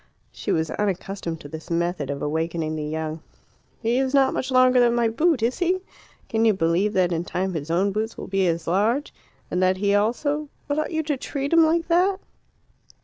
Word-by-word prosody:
She - - -4
was 160 -1 0
unaccustomed 190 -4 -3
to - - -9
this 160 +3 -9
method 170 -3 -1
of 140 0 -3
awakening 160 +1 -2
the 155 - -3
young. 155 +1 -4 0.6
"He 235 +3 +2
is 265 +1 0
not 270 -1 +4
much 260 - -2
longer 255 -1 +5
than 240 -1 +4
my 235 -1 +2
boot, 290 +2 +1
is 240 +2 0
he? 365 +1 +1 0.5
Can 225 0 0
you 220 -2 +5
believe 175 +4 +1
that 185 -2 +2
in 170 0 -1
time 185 +1 -2
his 155 -2 -4
own 185 +4 +2
boots 220 +3 -3
will - - -6
be 195 -1 +1
as 165 -1 -1
large? 220 - +1 0.4
And 180 - 0
that 185 0 +3
he 200 +1 +1
also 285 +8 0
" - - -39
"But 285 +1 0
ought 310 - -2
you 315 -1 -1
to 295 -2 -1
treat 280 +3 -3
him 330 0 +7
like 330 +1 +2
that?" 365 +3 +2
205 Hz, 210 wpm, -24 LUFS, 170-270 Hz, 0.6 s, him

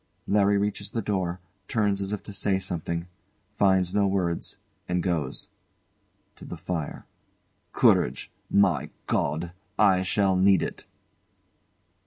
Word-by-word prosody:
LARRY 100 0 +3
reaches 100 0 -1
the 115 +1 -2
door, 95 -3 -1 0.3
turns 105 -4 +1
as 100 0 -3
if 105 - -4
to 105 - -9
say 100 -1 +1
something 85 -2 -3 0.5
finds 95 -2 +3
no 100 -1 +3
words, 90 -3 -1 0.3
and 90 -1 0
goes. 80 -8 -2 0.9
[To - - -13
the 90 - -7
fire] 80 -2 -4 0.7
Courage! 65 +2 +2 0.2
My 95 -8 +3 0.2
God! 80 +4 -1 0.3
I 95 -3 +5
shall 95 0 +2
need 95 +1 +4
it! - - -6
95 Hz, 125 wpm, -26 LUFS, 85-100 Hz, 0.9 s, I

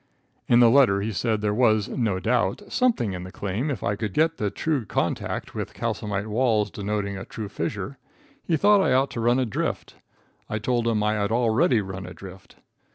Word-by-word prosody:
In 120 0 +5
the 120 - +7
letter 120 -7 +5
he 110 +2 -2
said 110 0 -1
there 105 -1 0
was, 110 -3 +3
no 110 -7 -1
doubt, 110 -2 0
something 230 - +1
in 90 -1 -5
the 90 - -9
claim 100 +11 -3
if 130 -9 -3
I 105 - 0
could 105 -1 -4
get 160 +1 +2
the 105 - -1
true 145 +5 -1
contact 105 - -2
with - - -5
calcimine 105 0 -3
walls 110 -3 +1
denoting 100 -1 -3
a - - -6
true 110 +1 -7
fissure. 100 - -4 0.4
He 165 - +1
thought 205 +2 +5
I 130 - +2
ought 135 +2 +2
to - - -5
run 120 +2 +3
a 130 - +1
drift. 110 - -3 0.5
I 110 - -2
told 120 +2 0
him 110 -2 +1
I 105 0 +2
had 105 0 -1
already 115 0 +3
run 95 -1 -7
adrift. 95 +1 -12
110 Hz, 200 wpm, -25 LUFS, 100-125 Hz, 0.5 s, the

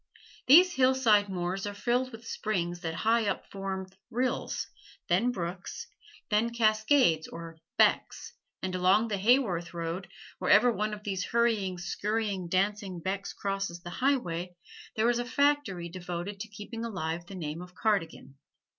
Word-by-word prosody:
These 355 +7 +8
hillside 255 - +4
moors 185 +2 -2
are 205 - -5
filled 250 +4 0
with 225 0 -11
springs 175 -6 -2
that 165 -1 -3
high 225 -1 +3
up 200 - -2
form 195 -1 -4 0.2
rills, 250 +2 -1 0.4
then 205 +8 +3
brooks, 180 -3 -5 0.5
then 215 +3 +3
cascades 215 - +3
or 165 -1 -9 0.2
"becks," 465 - +2 0.3
and 185 -1 -2
along 190 +5 +3
the 205 -2 -1
Haworth 190 -7 +2
road, 170 +2 -3 0.3
wherever 245 - +5
one 215 -1 -1
of 210 - -14
these 190 -3 -2
hurrying, 220 -6 +1
scurrying, 200 0 -2
dancing 195 0 0
becks 190 +3 -3
crosses 195 -3 -3
the 175 - -7
highway, 180 -10 -1 0.4
there 220 +1 +2
is 240 0 +2
a - - 0
factory 280 -10 +1
devoted 180 +2 -5
to 220 - -5
keeping 215 +2 -7
alive 170 -6 -3
the 195 - -8
name 160 -2 -4
of 180 0 -11
Cardigan. 165 -10 -1
200 Hz, 145 wpm, -29 LUFS, 175-230 Hz, 0.5 s, These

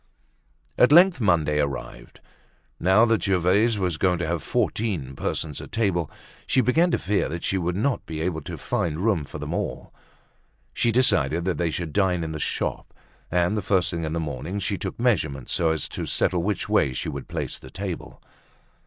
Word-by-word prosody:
At 125 - +6
length 175 -2 +6
Monday 80 -7 +2
arrived. 70 -3 -4 0.6
Now 95 +6 +5
that 115 -2 +2
Gervaise 100 +4 +2
was 90 -5 -1
going 90 +1 +2
to 85 - -2
have 85 0 -1
fourteen 85 - -1
persons 75 +2 -3
at - - -11
table, 95 -8 0 0.4
she - - +2
began 155 +8 +3
to - - +1
fear 100 +2 0
that 85 +1 -5
she 95 - 0
would 90 0 -1
not 125 +6 -1
be 80 -3 -5
able 80 -2 -2
to - - -7
find 75 -3 -2
room 90 -10 +1
for - - -8
them - - -5
all. - - -4 0.8
She 115 - +1
decided 85 - +3
that 95 - -1
they 85 -1 +1
should 80 -1 -4
dine 90 -4 +1
in 80 - -4
the 80 - -5
shop; - - -3 0.3
and 90 +3 +1
the 105 - -1
first 95 -1 +1
thing 85 -2 -3
in 80 0 -3
the 85 - -1
morning 75 +4 -4
she 100 +1 -1
took - - -5
measurements 80 - 0
so 85 -3 +2
as 80 -3 -1
to - - -5
settle 90 -2 +1
which 100 +1 -2
way 65 - +2
she - - -3
should - - -7
place - - -4
the 65 - -12
table. 95 +3 -6
90 Hz, 195 wpm, -24 LUFS, 80-105 Hz, 0.8 s, At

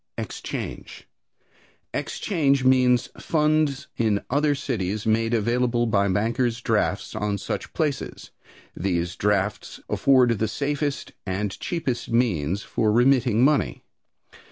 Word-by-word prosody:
Exchange. - - -6 0.9
"Exchange" 140 -9 0
means 125 -2 +4
funds 155 -3 +1
in 110 -3 +1
other 145 +1 +2
cities 110 -7 -3
made 115 +1 +2
available 120 +1 +1
by 100 -3 +2
bankers' 115 +4 0
drafts - - 0
on 105 -1 -1
such - - -5
places. 150 -4 -3 0.4
These 90 -1 -1
drafts 105 0 -1
afford 125 -5 +3
the 110 - +1
safest 145 +4 -2 0.2
and 95 +2 -1
cheapest 145 -8 -3
means 100 - +1
for 110 -1 0
remitting 120 -1 +3
money. 140 - +1
120 Hz, 105 wpm, -24 LUFS, 105-135 Hz, 0.9 s, means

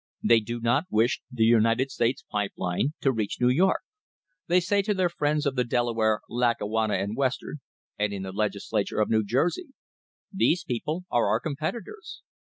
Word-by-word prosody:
They 115 -1 +5
do 115 +2 -5
not 120 +7 +1
wish 110 +3 +1
the 120 -3 +1
United 115 +3 +3
States 130 +5 -1
Pipe 105 -1 -1
Line 95 - -1
to 135 - +3
reach 110 -5 -2
New 125 - +4
York. 180 +9 +3 0.7
They 180 +1 +4
say 200 +3 +1
to 205 +1 -1
their 185 -2 +2
friends 150 -2 0
of 140 -2 0
the 125 - +2
Delaware, 115 -3 +1
Lackawanna 110 -3 0
and 100 +3 -2
Western, 135 +1 -2 0.4
and 105 0 +1
in 100 -1 -5
the 95 - -5
Legis 100 0 -3
lature 100 - 0
of 105 - +1
New 110 -1 +3
Jersey: 175 - -1 0.6
"These 180 -3 +2
people 155 +9 -3
are 120 -3 +2
our 110 +2 +2
competitors." 230 - -5
120 Hz, 175 wpm, -26 LUFS, 110-150 Hz, 0.7 s, They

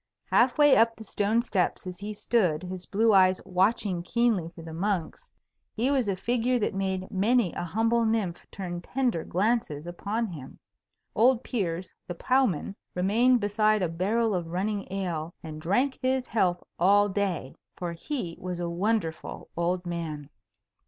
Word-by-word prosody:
Half 250 +1 +4
way 290 -2 +7
up 230 +1 +4
the 225 - -10
stone 215 +3 +1
steps 190 -7 -1
as 180 -1 -7
he 205 +1 -5
stood, 190 -7 +1
his 180 0 -6
blue 220 +2 +3
eyes 185 -1 +5
watching 190 0 +1
keenly 215 -3 +1
for 165 - -10
the 160 0 -8
monks, 195 - -2 0.4
he 245 +5 +1
was 260 -7 +1
a 195 - 0
figure 245 +5 +1
that 210 - -1
made 190 0 -2
many 210 0 +2
a - - -4
humble 225 +6 +1
nymph 220 -6 -1
turn 175 -3 -5
tender 245 -5 -1
glances 190 -6 0
upon 205 +6 -2
him. 155 -10 -9 0.6
Old 245 +2 +4
Piers, 180 -6 -3
the 175 - -5
ploughman, 225 - +1 0.2
remained 230 +7 +3
beside 215 0 +2
a - - +2
barrel 210 +7 0
of 175 -3 -2
running 195 +3 -2
ale 175 -4 -3
and 155 -1 -7
drank 250 - +1
his 260 0 +1
health 180 -7 0 0.2
all 200 +3 +5
day. 190 -9 -2 0.2
For 175 -1 -3
he 175 - -4
was 180 -1 -4
a 175 - -2
wonderful 175 -1 -2
old 175 +2 -1
man. 155 -4 -5
195 Hz, 160 wpm, -27 LUFS, 175-230 Hz, 0.6 s, way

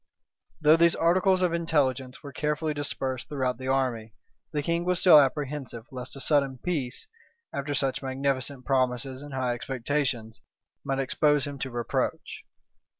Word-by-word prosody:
Though 155 +1 +6
these 170 0 +5
articles 185 +2 +3
of 175 -2 +2
intelligence 135 -6 0
were 140 -2 -9
carefully 150 +2 -1
dispersed 135 -3 -3
throughout 130 -4 -1
the 130 - -5
army, 125 -5 -1 0.4
the 150 -2 -1
king 170 +2 0
was 180 0 +1
still 175 -5 +8
apprehensive 135 -4 -1
lest 130 0 -7
a - - -8
sudden 140 -2 +2
peace, 135 -5 -3 0.5
after 145 +1 -2
such 135 0 0
magnificent 135 0 -2
promises 130 0 0
and 145 -2 -8
high 130 -2 0
expectations, 125 -2 -2 0.4
might 135 - -1
expose 145 +2 +2
him 140 -1 -6
to 135 - -3
reproach. 120 -2 -3
135 Hz, 150 wpm, -27 LUFS, 130-150 Hz, 0.5 s, still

